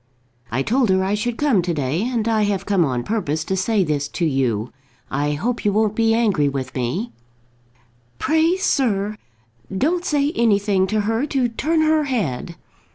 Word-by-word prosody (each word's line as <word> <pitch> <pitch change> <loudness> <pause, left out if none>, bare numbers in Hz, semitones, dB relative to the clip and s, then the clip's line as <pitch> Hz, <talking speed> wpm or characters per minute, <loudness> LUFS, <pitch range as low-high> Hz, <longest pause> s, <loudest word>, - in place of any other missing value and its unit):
I 130 +4 -1
told 245 - +1
her 190 0 +3
I 195 +2 0
should 230 +3 -2
come 275 -10 +2
to 175 -1 -2
day, 145 +4 -1
and 230 -1 -1
I 220 -1 +2
have 195 -2 -1
come 195 -4 +2
on 125 -5 -1
purpose 160 - -1
to 190 - -2
say 195 +2 +1
this 145 -3 -1
to 170 - -2
you. 125 -7 0 0.4
I 145 +2 0
hope 230 +11 -2
you 205 - +2
won't 215 0 +1
be 225 0 +2
angry 200 -11 +2
with 135 -2 -4
me." 140 - -2 1.1
"Pray, 320 +5 +2
sir, 215 - 0 0.5
don't 320 - 0
say 290 -3 +1
anything 205 - +2
to 215 +2 0
her 225 +7 0
to 260 -4 0
turn 315 +8 0
her 310 -1 +3
head." 170 - -2
205 Hz, 175 wpm, -21 LUFS, 160-240 Hz, 1.1 s, her